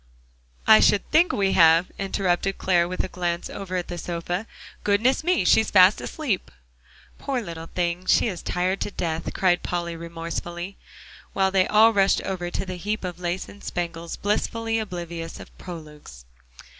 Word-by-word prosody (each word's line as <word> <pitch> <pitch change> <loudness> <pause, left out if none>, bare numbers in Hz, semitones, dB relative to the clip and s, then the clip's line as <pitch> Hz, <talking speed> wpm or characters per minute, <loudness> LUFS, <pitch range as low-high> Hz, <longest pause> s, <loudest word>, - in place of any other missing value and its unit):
"I 220 - +8
should 205 - +3
think 335 +3 +5
we 195 -1 +1
have," 165 +1 +5
interrupted 195 -1 0
Clare 175 -2 +2
with 185 +1 -2
a - - -3
glance 175 -1 -3
over 190 -2 -5
at 180 -1 -2
the 175 - -5
sofa. 175 +5 -4 0.4
"Goodness 225 +8 +2
me, 345 - +2
she's 220 +4 +4
fast 190 +1 +6
asleep!" 270 - -3 0.7
"Poor 270 -2 -2
little 165 -7 -7
thing, 175 +1 -2
she - - +4
is 185 -5 -4
tired 185 +2 -1
to - - -1
death," 165 -4 -3
cried 180 -2 +2
Polly 170 -1 -3
remorsefully, 170 +2 -6 0.6
while 190 -1 +2
they 190 -1 +3
all 220 +2 +5
rushed 195 -1 +3
over 175 -2 -3
to 175 - -3
the 185 -1 -5
heap 210 +4 -3
of 180 -1 -5
lace 175 +1 -3
and 205 - -14
spangles, 170 -1 -4
blissfully 225 +2 -1
oblivious 170 -5 -6
of - - -13
"prologues." 150 - -10
180 Hz, 165 wpm, -24 LUFS, 170-200 Hz, 0.7 s, I